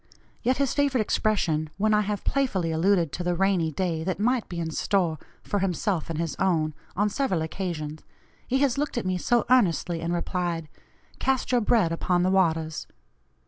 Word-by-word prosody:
Yet 255 +1 +1
his 275 -2 +1
favorite 280 -4 +2
expression, 170 -8 0
when 215 +2 +2
I 210 - +4
have 210 -1 -3
playfully 200 -12 0
alluded 170 -1 +2
to 175 - -4
the 175 0 0
'rainy 185 -3 +2
day' 165 0 -2
that 180 0 -2
might 245 +2 +1
be 175 - -4
in 165 -1 -2
store 170 -3 0 0.2
for 205 - -1
himself 185 -2 -1
and 165 - -3
his 165 0 -2
own 160 -5 +1 0.2
on 205 +3 +2
several 200 - 0
occasions, 155 -3 -4 0.5
he 260 - +1
has 280 -1 +2
looked 295 -3 -2
at 240 - -1
me 185 -1 0
so 240 +5 +2
earnestly 180 -8 +2
and 165 +1 -2
replied, 175 -2 -2 0.5
'Cast 265 -1 0
your 245 -1 +3
bread 210 -6 +3
upon 175 +1 +1
the 185 - +2
waters.' 160 -4 +1
185 Hz, 185 wpm, -26 LUFS, 165-215 Hz, 0.5 s, I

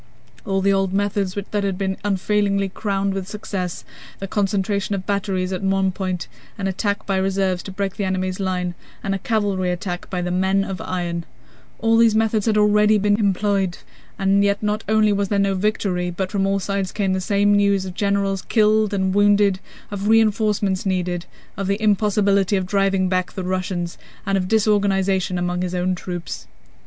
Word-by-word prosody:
All 195 -1 +1
the 195 +1 +3
old 195 -1 0
methods 200 -1 0
that 205 0 -2
had 195 -2 -1
been 190 -1 -1
unfailingly 200 0 +1
crowned 195 0 -1
with 190 -1 -4
success: 200 -4 -5 0.3
the 195 - -5
concentration 200 0 0
of 185 -1 -5
batteries 190 -2 -1
on 190 +1 -1
one 195 -1 +2
point, 185 -5 -3 0.3
an 200 - -3
attack 200 +2 -1
by 195 -1 0
reserves 190 -1 0
to 195 - -8
break 195 0 -3
the 205 - -1
enemy's 185 0 -1
line, 180 -2 -1 0.3
and 195 - -1
a 195 - -2
cavalry 200 -4 0
attack 180 0 -4
by 180 - -2
"the 180 - -2
men 190 +2 +2
of 195 -1 -5
iron," 175 -2 -3 0.5
all 225 0 +2
these 230 -1 +5
methods 220 -1 +1
had 215 -1 +3
already 210 0 +4
been 205 +1 +2
employed, 200 -2 +1 0.4
yet 200 +1 +2
not 210 +1 -1
only 215 -1 +4
was 200 0 0
there 205 - +1
no 200 0 +2
victory, 190 -2 0
but 185 +2 -3
from 195 -2 +1
all 195 0 +1
sides 195 -1 -2
came 195 -3 0
the 190 - -1
same 205 +2 +2
news 200 -1 +3
of 185 - -6
generals 200 -1 0
killed 215 -2 +2
and 190 -1 0
wounded, 205 -1 +4 0.3
of 200 0 -3
reinforcements 210 -3 +2
needed, 180 -2 -1 0.3
of 195 -1 -3
the 200 +1 0
impossibility 205 -2 +2
of 190 -1 0
driving 195 -1 +1
back 185 -1 -1
the 190 - -4
Russians, 180 -1 -3 0.3
and 195 -1 +1
of 185 -1 0
disorganization 195 -3 +2
among 180 0 -1
his 180 0 -2
own 180 +1 0
troops. 180 -1 -6
195 Hz, 180 wpm, -21 LUFS, 185-205 Hz, 0.5 s, these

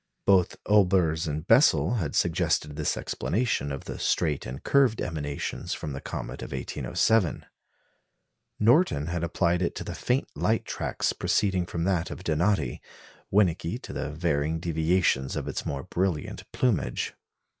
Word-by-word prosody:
Both 95 -3 +4
Olbers 90 -6 +3
and 75 +1 -3
Bessel 125 - +4
had 80 -9 -2
suggested 75 -1 +1
this - - -1
explanation 80 - -1
of 70 - -5
the - - -6
straight 75 -5 0
and 65 +3 -7
curved 135 -5 +3
emanations 75 -4 -3
from 75 - -5
the 70 - -6
comet - - -6
of - - -7
1807; 110 -7 0 1.1
Norton 115 - +4
had 85 +1 -3
applied 85 +1 +1
it 85 - -1
to - - -4
the - - -5
faint 130 +3 0
light 110 +1 +1
tracks - - -2
proceeding 95 -4 +1
from 85 -2 -3
that 90 -2 0
of 95 - -8
Donati; 80 -4 0 0.5
Winnecke 95 +1 +2
to - - -7
the 75 - -3
varying 80 0 -1
deviations 80 -4 +1
of - - -3
its - - -4
more 70 -1 -3
brilliant 90 -4 -2
plumage. 95 - 0
85 Hz, 145 wpm, -27 LUFS, 75-100 Hz, 1.1 s, Both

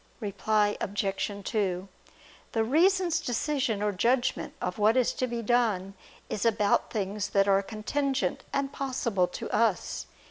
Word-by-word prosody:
Reply 210 0 +1
Obj. 200 0 -1
2: 190 -3 -1 0.7
The 225 - +2
reason's 345 - +3
decision 250 -3 -1
or 210 - +2
judgment 240 +6 0
of 180 +3 -3
what 215 +4 +4
is 250 - +3
to 255 - -1
be 235 -1 -3
done 210 -5 +1 0.3
is 205 - -3
about 210 -3 +2
things 205 -1 -2
that 195 0 +3
are 195 0 +4
contingent 265 +7 -2
and 280 0 -1
possible 240 -9 0
to - - -6
us. 220 -5 0
220 Hz, 140 wpm, -28 LUFS, 200-255 Hz, 0.7 s, what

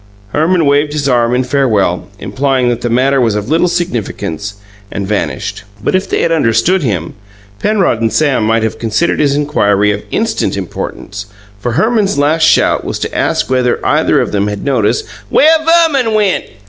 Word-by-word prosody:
Herman 160 - +1
waved 145 +1 +2
his 145 -2 -1
arm 120 -2 +2
in 125 - +1
farewell, 110 -10 0
implying 130 +1 0
that 120 0 -2
the 120 - -2
matter 130 +3 +2
was 115 -3 +1
of 105 +3 -3
little 165 +2 +3
significance, 110 - -3 0.4
and 100 - -4
vanished. 105 0 -3 0.2
But - - 0
if 185 +1 0
they - - 0
had 165 - +1
understood 160 +5 +2
him, 95 - -2 0.5
Penrod 195 - +1
and 115 -1 +1
Sam 135 0 +1
might 110 +1 +1
have 110 - -3
considered 115 +9 0
his 140 -2 +2
inquiry 105 -8 +1
of 100 0 -3
instant - - -1
importance, 100 0 -6 0.3
for 120 +3 -3
Herman's 215 - +1
last 155 +3 +2
shout - - +3
was - - -4
to - - -5
ask - - 0
if 125 -1 +1
either - - +2
of - - -1
them 100 0 0
had 105 -1 -5
noticed 125 -7 0 0.2
"where 315 +2 +5
Verman 320 -9 +3
went." 205 -3 +1
130 Hz, 175 wpm, -13 LUFS, 110-160 Hz, 0.5 s, where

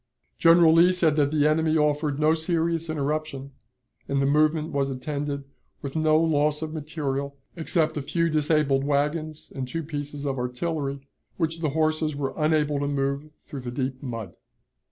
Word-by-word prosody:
General 165 -1 +6
Lee 170 +2 +6
said 170 -4 +2
that 145 -2 +3
the 150 0 +2
enemy 160 +1 +2
offered 150 -1 +1
no 155 +1 +4
serious 165 0 -1
interruption, 150 -2 -3 0.6
and 140 - 0
the 135 - +2
movement 155 +2 +2
was 140 -2 0
attended 140 +1 -3 0.4
with 140 +1 -5
no 155 -1 +3
loss 150 -1 +1
of 155 0 -5
material 140 -3 -3 0.2
except 160 -1 0
a 150 - -2
few 165 +4 0
disabled 150 -3 +2
wagons 150 +2 -1
and 130 -2 -3
two 165 +6 -4
pieces 145 -1 -5
of 135 -2 -2
artillery, 140 +2 -3 0.4
which 165 0 -1
the 160 -2 0
horses 155 0 0
were 140 -2 -2
unable 150 -2 +1
to 140 - -1
move 140 +1 -1
through 140 - -9
the 125 - -5
deep 130 +1 -3
mud. 115 -9 -6
150 Hz, 165 wpm, -25 LUFS, 140-160 Hz, 0.6 s, General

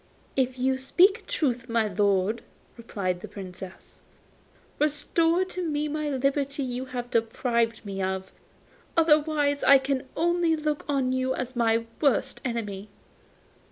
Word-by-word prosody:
'If 260 -1 0
you 260 +1 +1
speak 360 +9 +3
truth, 250 - -1
my 230 -1 +2
lord,' 200 +2 +1 0.3
replied 195 -6 -3
the - - -7
Princess, 185 -1 -10 0.8
'restore 330 +4 +2
to 365 -1 -4
me 300 -2 -1
the 300 -2 -2
liberty 275 +1 0
you 250 0 -3
have 245 -1 -6
deprived 230 0 0
me 195 -1 -4
of. 190 0 -2 0.7
Otherwise 300 -3 +3
I 275 - +8
can 265 0 -2
only 340 0 +2
look 305 -1 -2
on 270 -3 +1
you 260 0 0
as 255 0 -4
my 230 -1 +2 0.2
worst 270 -2 +1
enemy. 215 -5 -4
260 Hz, 130 wpm, -26 LUFS, 230-295 Hz, 0.8 s, I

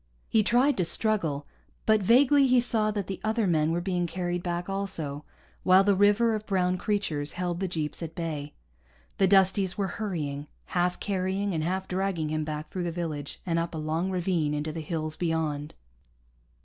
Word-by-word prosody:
He 220 - +3
tried 250 +7 +3
to 185 - +2
struggle, 170 -7 0 0.4
but 215 -1 +4
vaguely 270 +7 +5
he 255 -1 +5
saw 225 -3 +1
that 205 -2 -2
the 190 -1 -6
other 220 0 +1
men 160 -3 +2
were 170 +1 0
being 175 -1 -1
carried 175 0 -2
back 175 0 -3
also, 180 -7 -4 0.4
while 185 +1 +6
the 200 0 +4
river 205 +4 +4
of 215 0 -4
brown 185 -2 +1
creatures 170 -9 -1
held 175 -1 -2
the 190 - -1
jeeps 155 -3 -3
at 165 -1 -6
bay. 155 -4 -4 0.6
The 195 - +5
Dusties 190 0 +3
were 200 +2 -3
hurrying, 150 -8 -3 0.3
half 180 0 +1
carrying 195 0 -1
and 160 -2 -1
half 185 +3 -2
dragging 185 -4 -1
him 155 0 -1
back 150 0 -5
through 180 -2 -3
the 170 - -1
village 155 -4 -5
and 165 -2 +1
up 165 0 -3
a - - -3
long 160 +4 -1
ravine 175 -5 0
into 150 +1 -2
the 160 +1 -5
hills 155 -1 -3
beyond. 160 -3 -2
180 Hz, 185 wpm, -28 LUFS, 160-200 Hz, 0.6 s, while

